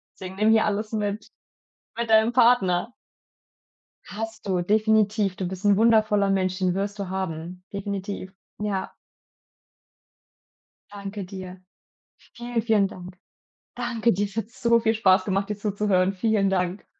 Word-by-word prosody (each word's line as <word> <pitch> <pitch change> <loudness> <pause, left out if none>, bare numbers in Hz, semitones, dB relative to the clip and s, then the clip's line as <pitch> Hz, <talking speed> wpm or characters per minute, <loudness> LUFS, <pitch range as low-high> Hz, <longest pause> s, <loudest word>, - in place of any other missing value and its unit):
Deswegen 185 0 -8
nimm 215 +2 +2
hier 220 0 +4
alles 210 +1 -2
mit 210 -1 -3 0.7
mit 235 - -1
deinem 220 +1 +4
Partner. 235 -4 +3 1.1
Hast 225 0 -6
du, 185 -2 +1
definitiv. 210 0 +2
Du 185 - -4
bist 190 +2 -7
'n 200 -1 +5
wundervoller 215 -3 +3
Mensch, 185 -1 0
den 185 -2 +1
wirst 200 +2 -3
du 195 -2 -4
haben. 180 -1 -5
Definitiv. 200 -1 -5 0.3
Ja. 200 -2 -2 2.0
Danke 200 0 -7
dir. 185 -1 -9 0.7
Vielen, 240 -1 -3
vielen 215 -3 +2
Dank. 180 0 -11 0.6
Danke 240 -2 0
dir. 200 +3 0
Es 200 - -14
hat 225 0 -3
so 235 -1 +2
viel 225 0 +1
Spaß 190 -3 +4
gemacht, 195 +1 -1
dir 210 - -2
zuzuhören. 200 -2 +1
Vielen 200 0 +1
Dank. 180 0 -1
200 Hz, 140 wpm, -25 LUFS, 190-220 Hz, 2.0 s, n